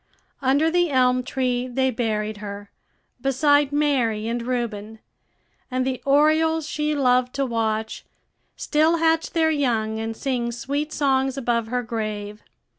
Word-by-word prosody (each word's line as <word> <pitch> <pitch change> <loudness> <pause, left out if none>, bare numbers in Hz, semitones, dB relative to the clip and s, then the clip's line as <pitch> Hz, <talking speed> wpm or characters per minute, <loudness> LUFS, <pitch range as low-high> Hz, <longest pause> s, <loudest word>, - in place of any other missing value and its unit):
Under 285 +4 +2
the 350 0 +2
elm 255 -2 +3
tree 250 -1 -1
they 260 +1 0
buried 215 -3 -2
her, 205 -1 -8 0.5
beside 285 +1 +3
Mary 255 -7 +1
and 235 +1 -2
Reuben; 230 -3 -3 0.7
and 255 0 -1
the 260 -1 -2
orioles 310 +2 +3
she 300 0 -1
loved 250 -2 +2
to 275 0 0
watch 220 -2 -2 0.5
still 315 +2 +2
hatch 325 0 +2
their 320 -2 +2
young 225 -7 0
and 225 0 -4
sing 245 -4 -2
sweet 280 +6 -3
songs 270 -2 +1
above 235 -3 0
her 245 +1 -2
grave. 215 -2 -5
255 Hz, 135 wpm, -23 LUFS, 225-290 Hz, 0.7 s, elm